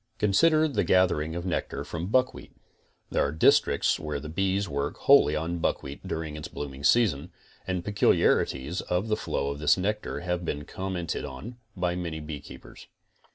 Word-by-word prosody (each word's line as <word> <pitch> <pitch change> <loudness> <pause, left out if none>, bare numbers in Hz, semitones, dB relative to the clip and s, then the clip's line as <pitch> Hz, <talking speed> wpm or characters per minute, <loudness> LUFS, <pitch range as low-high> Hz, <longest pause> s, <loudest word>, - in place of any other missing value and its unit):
Consider 155 +10 +4
the 120 -9 0
gathering 85 -4 +2
of 85 +1 -4
nectar 80 -5 -2
from 85 +4 -5
buckwheat. 130 +4 0 0.6
There - - +2
are - - 0
districts 80 - +3
where 75 -2 -4
the 75 - -8
bees 95 +4 0
work 70 0 -3
wholly 140 - +5
on 85 +3 -2
buckwheat 70 -3 -3
during 80 -2 -4
its 75 - -6
blooming 70 -2 -7
s2ason, 85 -4 +3 0.4
and 90 -2 -2
peculiarities 90 -6 +2
of 90 +5 -2
the 105 - +2
flow 70 -8 -2
of 70 - -6
this 75 +3 +4
nectar 105 +3 -2
have 90 0 -2
been 75 -3 -3
commented 95 -3 -4
on 85 - -8 0.2
by 90 -1 0
many 85 -3 -4
beekeepers. 75 -2 -10
85 Hz, 160 wpm, -27 LUFS, 75-95 Hz, 0.6 s, wholly